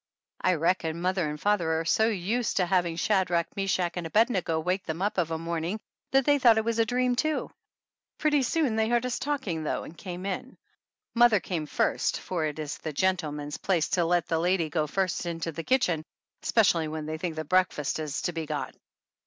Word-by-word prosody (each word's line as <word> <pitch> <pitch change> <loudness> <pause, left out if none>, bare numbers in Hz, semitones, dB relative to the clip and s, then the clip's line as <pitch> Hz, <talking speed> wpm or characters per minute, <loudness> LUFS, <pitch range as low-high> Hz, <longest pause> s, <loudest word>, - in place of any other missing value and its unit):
I 185 - +3
reckon 165 0 0
mother 180 -2 0
and 150 0 -5
father 170 -4 +1
are 165 - -3
so 220 +6 +3
used 220 +3 -1
to 185 - +3
hav 180 -1 +2
ing 165 - -4
Shadrach, 180 -3 +1
Meshach 185 -3 0
and 170 -2 -3
Abednego 190 -5 +2
wake 180 +4 -1
them 160 0 -4
up 200 0 0
of 165 -2 +1
a 160 - -2
morning 170 +4 -3 0.3
that 270 -1 +3
they 290 -1 +4
thought 235 -4 +6
it 220 - +1
was 230 0 0
a 225 - +3
dream, 250 +1 +1
too. 310 +5 -1 0.7
Pretty 295 -2 +2
soon 265 -2 +1
they 220 0 +2
heard 240 0 +2
us 250 - -2
talk 285 -1 -2
ing 165 -5 -2
though - - -2
and 160 - -10
came 180 +1 -7
in. 200 +7 -4 0.6
Mother 240 -3 +5
came 165 -3 -3
first, - - 0
for 170 -4 -2
it 150 -1 -3
is 155 -1 -5
the 155 - -4
gentleman's 150 -4 -1
place 175 -6 +1
to 175 - +2
let 175 -1 +1
the 165 - 0
lady 170 -2 +1
go 155 -1 0
first 185 +1 -1
into 165 -1 -3
the 165 +1 -6
kitchen, 180 -11 +1 0.4
especially 175 -8 +3
when 155 0 -4
they 155 +1 -4
think 170 -2 -3
that 155 -1 -5
breakfast 180 -6 +1
is 150 -2 -3
to - - 0
be 165 -2 -4
got. 150 -1 -3
180 Hz, 210 wpm, -28 LUFS, 160-220 Hz, 0.7 s, thought